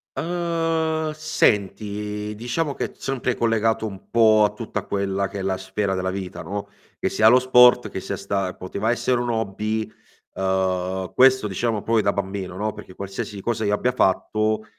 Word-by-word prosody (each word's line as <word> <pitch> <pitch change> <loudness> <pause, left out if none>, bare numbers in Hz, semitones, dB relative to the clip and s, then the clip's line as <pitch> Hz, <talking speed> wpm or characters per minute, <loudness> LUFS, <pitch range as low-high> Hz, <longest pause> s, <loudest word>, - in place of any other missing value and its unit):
Uhm, 165 -2 -1
senti, 105 -6 -1
diciamo 125 +7 -2
che - - -4
sempre 130 -2 -2
collegato 115 -1 +1
un 95 -2 -11
po' 110 -2 +5
a 105 - +3
tutta 105 -2 -5
quella 100 0 -1
che 100 +1 -7
è - - -3
la 95 0 -1
sfera 95 +1 -2
della 95 0 -1
vita, 95 -1 -6
no, 100 +1 -5 0.3
che - - 0
sia 110 0 +5
lo 125 +2 +6
sport 125 -1 +6
che - - -5
sia - - -4
sta 95 -2 -2
poteva 100 +5 -2
essere 120 +1 +1
un 120 0 -1
hobby, 110 0 -2 0.4
uhm, 95 -1 -1
questo 130 -3 +5
diciamo 105 +2 -1
proprio 115 0 +1
da 100 - +2
bambino, 95 -2 -4
no, 105 +1 -2
perché 95 - -11
qualsiasi 100 +1 -6
cosa 110 0 -1
io 100 - +1
abbia 125 +4 +1
fatto, 110 +2 +1
105 Hz, 170 wpm, -23 LUFS, 95-120 Hz, 0.4 s, lo